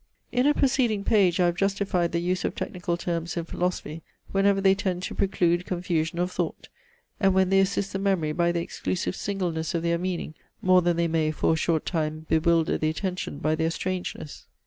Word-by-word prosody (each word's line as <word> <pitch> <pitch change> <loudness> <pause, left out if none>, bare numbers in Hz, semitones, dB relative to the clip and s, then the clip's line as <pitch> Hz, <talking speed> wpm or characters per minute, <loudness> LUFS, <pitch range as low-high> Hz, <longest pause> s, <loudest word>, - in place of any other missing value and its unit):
In 250 +3 +2
a 295 - +4
preceding 255 -7 +2
page 195 -5 +3
I 180 - +4
have 175 0 +1
justified 195 -3 0
the 170 - 0
use 180 +2 -1
of - - -2
technical 175 -1 -3
terms 170 -1 -3
in 170 - -2
philosophy, 170 -3 -3 0.3
whenever 195 0 +3
they 190 0 +5
tend 185 -2 -2
to - - -4
preclude 175 -2 +1
confusion 170 -2 -1
of 180 +1 0
thought, - - -4 0.5
and 195 -2 +3
when 190 -1 +3
they 195 - +5
assist 195 +1 0
the 195 - -1
memory 190 -6 +1
by 170 +2 +1
the 170 -1 -1
exclusive 185 +1 -3
singleness 175 -5 -2
of 165 - -1
their 170 0 +1
meaning 180 -3 -3 0.3
more 185 -1 +5
than 175 -1 +1
they 170 0 +2
may, 160 -1 +1
for 155 +1 +1
a - - +2
short 160 0 0
time, 155 -2 -2
bewilder 165 0 +2
the 155 - +1
attention 180 -1 -3
by 155 +2 0
their 160 +1 +1
strangeness. 180 -3 -5
175 Hz, 200 wpm, -26 LUFS, 165-190 Hz, 0.5 s, they